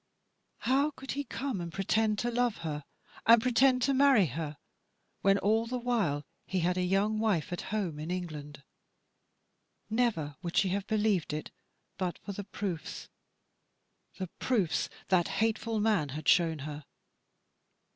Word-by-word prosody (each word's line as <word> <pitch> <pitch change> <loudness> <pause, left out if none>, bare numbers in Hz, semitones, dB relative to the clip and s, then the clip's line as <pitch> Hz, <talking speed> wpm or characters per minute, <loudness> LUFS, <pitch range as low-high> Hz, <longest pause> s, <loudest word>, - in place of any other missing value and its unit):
How 275 +5 +3
could 270 -2 -8
he 285 - -2
come 265 -8 -3
and 170 -1 -5
pretend 215 +3 +1
to 240 +3 -1
love 245 -1 +1
her, 150 -2 -3 0.4
and 230 +1 +9
pretend 255 +2 +3
to 275 - +3
marry 270 -6 +5
her, 150 +1 -4 0.6
when 195 0 +4
all 220 +3 +2
the 250 +2 -2
while 215 - 0 0.2
he 185 -2 0
had 180 +2 +1
a 185 - 0
young 195 +4 +1
wife 195 -7 +1
at 175 - -3
home 190 -8 -2
in 155 +2 -5
England? 150 -6 -5 1.3
Never 210 -12 0
would 175 -1 -4
she 195 - +4
have 195 +1 -2
believed 210 -7 +1
it 155 - -4 0.5
but 180 -2 -1
for 205 - -7
the 200 +1 -5
proofs, 190 -4 -5 1.1
the 190 - -2
proofs 205 -11 +1 0.2
that 180 -3 +4
hateful 225 +1 0
man 205 -9 +2
had 150 +2 -6
shown 165 -3 +4
her. 150 -1 -7
195 Hz, 150 wpm, -31 LUFS, 165-230 Hz, 1.3 s, and